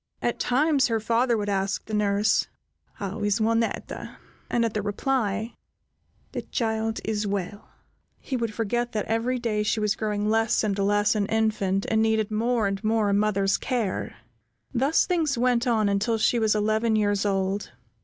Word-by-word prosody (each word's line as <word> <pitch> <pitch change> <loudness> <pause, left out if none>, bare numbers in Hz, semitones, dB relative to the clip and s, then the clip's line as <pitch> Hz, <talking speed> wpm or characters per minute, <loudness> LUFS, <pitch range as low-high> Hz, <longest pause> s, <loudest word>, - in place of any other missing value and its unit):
At 240 - -1
times 280 +1 +2
her 225 -2 0
father 235 +2 +1
would 205 -1 -2
ask 195 0 -1
the 220 - -8
nurse, 205 0 +2 0.5
"How 200 +2 -5
is 205 0 +1
Juanetta?" 225 +1 -1 0.3
and, 235 -1 +1
at 225 - -2
the 210 - -1
reply, 215 +1 -1 0.8
"The - - -3
child 220 -2 -2
is 210 -1 -1
well," 200 +1 -4 0.5
he 265 - -5
would 230 -3 -1
forget 240 +3 -2
that 210 -2 -1
every 230 +3 0
day 225 -3 -1
she 210 +1 0
was 210 -1 +1
growing 210 -1 -2
less 225 +1 +2
and 205 -2 0
less 205 +1 +2
an 205 -2 0
infant, 210 -3 0
and 220 0 +3
needed 220 -1 +1
more 230 +1 +1
and 195 +1 -2
more 215 -1 +2
a - - +2
mother's 200 -1 +2
care. 235 -7 -2 0.6
Thus 270 +5 +2
things 320 -7 0
went 245 0 +2
on 220 -3 +2
until 200 +3 +1
she 235 +2 +2
was 220 -1 +2
eleven 220 +2 +1
years 205 -2 +1
old. 195 0 -1
220 Hz, 170 wpm, -25 LUFS, 205-230 Hz, 0.8 s, and